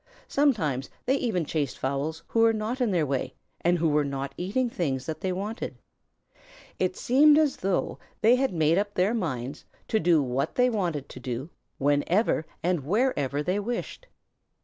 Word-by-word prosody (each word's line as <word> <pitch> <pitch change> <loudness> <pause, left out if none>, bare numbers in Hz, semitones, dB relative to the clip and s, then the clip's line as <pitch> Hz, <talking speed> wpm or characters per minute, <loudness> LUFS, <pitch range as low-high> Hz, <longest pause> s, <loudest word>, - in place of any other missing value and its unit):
Sometimes 165 - +1 0.2
they 260 - +3
even 200 - -1
chased 145 -3 -2
fowls 145 +5 -2
who 230 - 0
were 225 0 +5
not 220 +4 -3
in 245 - +2
their 175 -5 +2
way 135 -2 -2 0.3
and 175 +1 +3
who 165 0 +1
were 150 -1 +3
not 140 -1 -4
eating 210 +8 0
things 135 - -2
that 155 - -5
they 190 - -1
wanted. 205 +5 -4 1.0
It 185 0 0
seemed 290 +4 +5
as 310 -3 +2
though 190 0 -1 0.2
they 230 +3 +6
had 265 +1 +1
simply 175 - -6
made 170 - +4
up 205 0 -3
their 190 +5 +2
minds 140 - -3 0.3
to 220 - +2
do 170 -3 +4
what 135 +4 -2
they 250 0 +3
wanted 175 - -2
to - - -9
do, 130 +5 -5 0.3
whenever 155 - +1 0.2
and 175 -4 +1
wherever 150 - 0
they 185 +5 0
wished. 240 - -4
180 Hz, 175 wpm, -27 LUFS, 145-225 Hz, 1.0 s, they